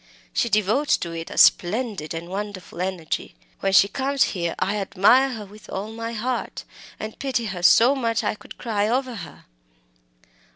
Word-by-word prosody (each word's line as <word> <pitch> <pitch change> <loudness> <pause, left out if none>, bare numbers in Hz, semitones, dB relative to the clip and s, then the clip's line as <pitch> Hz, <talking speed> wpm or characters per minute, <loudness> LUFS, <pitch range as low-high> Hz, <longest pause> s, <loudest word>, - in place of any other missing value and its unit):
She 235 - +1
devotes 220 +8 +2
to 170 - -5
it 165 0 -6
a - - -8
splendid 195 -4 +3
and 165 +1 -6
wonderful 190 -2 -6
energy. 180 - -3 0.2
When 195 - 0
she 195 +1 +6
comes 275 +4 +1
here 170 -4 -2
I 205 +2 0
admire 200 +7 +4
her 215 -3 -7
with 210 +2 -15
all 205 +3 -4
my 230 +1 -5
heart, 240 +2 -3 0.4
and 215 0 -7
pity 260 -4 -1
her 190 -4 -5
so 235 +8 +6
much 230 -4 0
that 215 - -2
I - - -5
could 210 - -13
cry 210 -3 -1
over 255 +2 0
her!" 180 -8 -10
210 Hz, 175 wpm, -23 LUFS, 190-235 Hz, 0.4 s, she